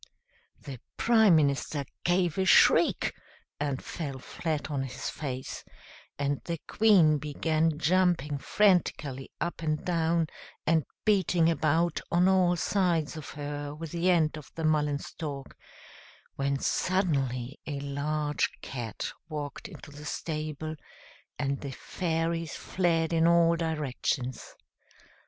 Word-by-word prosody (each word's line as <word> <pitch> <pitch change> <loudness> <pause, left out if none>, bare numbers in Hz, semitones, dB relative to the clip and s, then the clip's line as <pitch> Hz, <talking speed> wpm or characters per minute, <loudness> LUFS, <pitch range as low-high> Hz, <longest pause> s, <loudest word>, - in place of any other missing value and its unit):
The 135 -4 -8 0.2
Prime 220 -6 +5
Minister 140 -1 +1 0.2
gave 175 0 +1
a 190 - +2
shriek, 180 - +5 0.5
and 140 -2 -2
fell 140 -5 -5
flat 155 +3 -4
on 140 -2 -1
his 135 -1 -4
face, 130 -3 -5 0.5
and 140 0 -1
the 170 -1 -2
Queen 180 -9 +5
began 155 +2 0
jumping 165 -4 +2
frantically 150 -9 +1
up 170 - -3
and 155 -2 -1
down, 165 -1 +2 0.4
and 160 -3 +3 0.2
beating 180 -5 +3
about 165 +1 +1
on 175 +2 +4
all 185 -2 +4
sides 170 -4 +1
of 155 -2 -7
her 145 0 -5
with 160 0 -7
the 175 +2 +1
end 160 -3 +2
of 150 - -14
the 165 - -4
mullen 150 -2 +2
stalk, 145 -2 -7 0.8
when 140 0 0
suddenly 140 -8 0
a 145 -2 -3
large 145 +1 -1
Cat 120 -5 -5 0.2
walked 150 -2 -5
into 145 - -12
the 145 +1 -10
stable, 155 0 -4 0.6
and 140 -1 -1
the 140 - -5
fairies 165 0 -2
fled 170 -3 0
in 165 0 +4
all 170 0 +5
directions. 150 -5 -2
155 Hz, 125 wpm, -29 LUFS, 145-170 Hz, 0.8 s, Prime